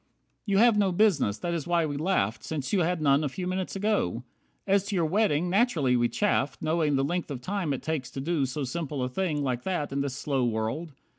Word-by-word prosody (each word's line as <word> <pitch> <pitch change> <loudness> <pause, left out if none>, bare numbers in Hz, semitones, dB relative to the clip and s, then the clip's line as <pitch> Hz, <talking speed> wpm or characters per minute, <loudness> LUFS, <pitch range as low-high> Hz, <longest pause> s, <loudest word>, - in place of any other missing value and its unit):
55 - - -45
You 195 - +3
have 230 0 +5
no 195 -2 +3
business, 175 - +2
that 175 -1 -3
is 165 -2 -3
why 170 -2 +2
we 145 -2 -3
laughed, 140 - 0
Since 150 0 -4
you 200 - +4
had 175 -1 0
none 140 +1 +4
a 145 - 0
few 180 +7 -5
minutes 185 +1 -3
ago. 195 - 0 0.4
As 200 0 +2
to 200 - -2
your 170 -3 +2
wedding, 175 -2 +2
naturally 175 - +2
we 120 -1 +2
chaffed, 145 - 0
Knowing 155 -2 +1
the 135 - +2
length 175 +4 -2
of 140 -4 -4
time 185 +3 -2
it 135 - -3
takes 150 -4 -2
to - - -5
do 155 +2 -1
A 135 - +1
simple 140 0 -3
thing 150 0 -1
like 125 -3 -1
that 165 -3 -2
in 140 0 -1
this 140 -2 -3
slow 140 -2 -1
world. 120 +8 -2
155 Hz, 230 wpm, -27 LUFS, 135-185 Hz, 0.4 s, have